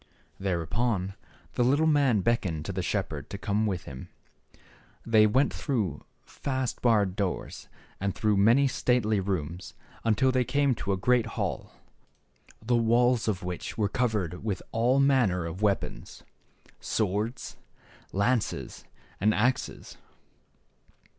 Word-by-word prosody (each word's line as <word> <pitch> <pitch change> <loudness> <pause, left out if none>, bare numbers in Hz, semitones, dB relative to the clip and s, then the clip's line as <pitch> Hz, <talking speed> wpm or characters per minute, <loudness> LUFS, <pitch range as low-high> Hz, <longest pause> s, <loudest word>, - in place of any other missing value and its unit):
Thereupon 95 +2 -1 0.4
the 125 - +1
little 140 +6 +3
man 140 -9 +3
beckoned 90 -7 0
to - - -3
the 95 - -2
shepherd 90 -7 -3
to 100 - -5
come 105 +2 0
with 95 -4 -2
him. 65 -2 -9 1.0
They 110 -2 +5
went 130 +7 +2
through 105 - -2 0.2
fast 130 -3 -3
barred 105 -6 +3
doors, 100 -3 -4 0.3
and 100 0 -2
through 105 -2 +1
many 115 +8 +5
stately 120 -5 +1
rooms, 90 -2 -4 0.3
until 115 +4 +3
they 130 -1 +2
came 140 +1 +2
to 100 -3 -3
a 95 - +1
great 120 +4 +2
hall, - - -3 0.9
the 120 +1 +2
walls 120 +1 +3
of 100 -3 -1
which 90 -1 -5
were 105 -2 +1
covered 105 -8 -1
with 105 -4 -3
all 120 +4 +2
manner 125 -11 +3
of 85 +4 -6
weapons: 100 -2 -2 0.6
swords, 105 +3 -2 0.5
lances, 110 +3 -1 0.3
and 105 +2 +3
axes. 125 +4 -1
110 Hz, 125 wpm, -28 LUFS, 95-125 Hz, 1.0 s, They